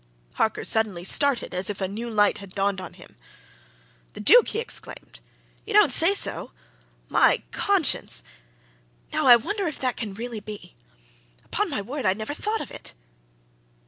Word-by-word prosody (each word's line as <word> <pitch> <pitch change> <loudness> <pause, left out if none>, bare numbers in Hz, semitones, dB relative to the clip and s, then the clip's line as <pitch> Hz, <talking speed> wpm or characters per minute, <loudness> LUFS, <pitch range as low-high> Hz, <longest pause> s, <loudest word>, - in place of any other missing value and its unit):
Harker 220 - -1
suddenly 210 -6 0
started 275 +7 +1
as 180 +2 0
if 205 - -5
a 190 - -1
new 225 +5 -6
light 210 -2 +2
had 200 -2 -12
dawned 195 -1 -1
on 180 - -9
him. - - -16 1.0
"The - - -10
Duke!" 465 - +6
he - - -2
exclaimed. 470 +1 -5 0.4
"You 425 - -7
don't 420 -9 +6
say 335 +9 +4
so! 400 - -1 0.5
My - - +3
conscience! - - +1 0.9
now, - - 0
I 245 - +10
wonder 395 - -2
if 310 - -4
that 255 -2 -2
can 210 -4 -5
really 235 0 -6
be? 210 - -10 0.7
Upon - - -2
my 200 - -3
word, 260 +1 -4
I'd 190 +2 +1
never 220 +6 -5
thought 425 +8 -3
of - - -8
it!" - - -11
220 Hz, 165 wpm, -24 LUFS, 200-290 Hz, 1.0 s, I